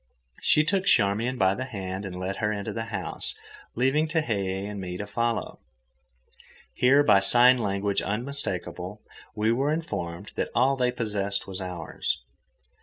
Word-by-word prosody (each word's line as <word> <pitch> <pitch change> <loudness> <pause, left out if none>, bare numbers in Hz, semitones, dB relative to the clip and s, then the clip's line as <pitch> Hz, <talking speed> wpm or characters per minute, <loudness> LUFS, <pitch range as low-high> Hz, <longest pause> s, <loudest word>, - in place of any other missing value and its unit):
She 150 - +4
took 190 +4 0
Charmian 115 - +3
by 95 -2 +3
the 130 +6 -4
hand 95 -5 -5
and 90 -1 -6
led 95 +1 -3
her 105 0 0
into 100 -2 -3
the 115 0 -3
house, 100 -6 -2 0.4
leaving 135 +6 +2
Tehei 100 - -1
and 105 -1 -5
me 90 -1 -5
to 105 - -4
follow. 115 +3 -2 1.1
Here, 135 - +5
by 100 -9 +6
sign 120 +5 +6
language 100 -2 0
unmistakable, 105 -4 -4 0.3
we 110 +1 +2
were 135 +5 +1
informed 100 - -4
that - - -1
all 130 +3 +4
they 125 -2 +1
possessed 105 -4 -2
was 95 0 -6
ours. 90 -3 -3
105 Hz, 150 wpm, -26 LUFS, 95-125 Hz, 1.1 s, by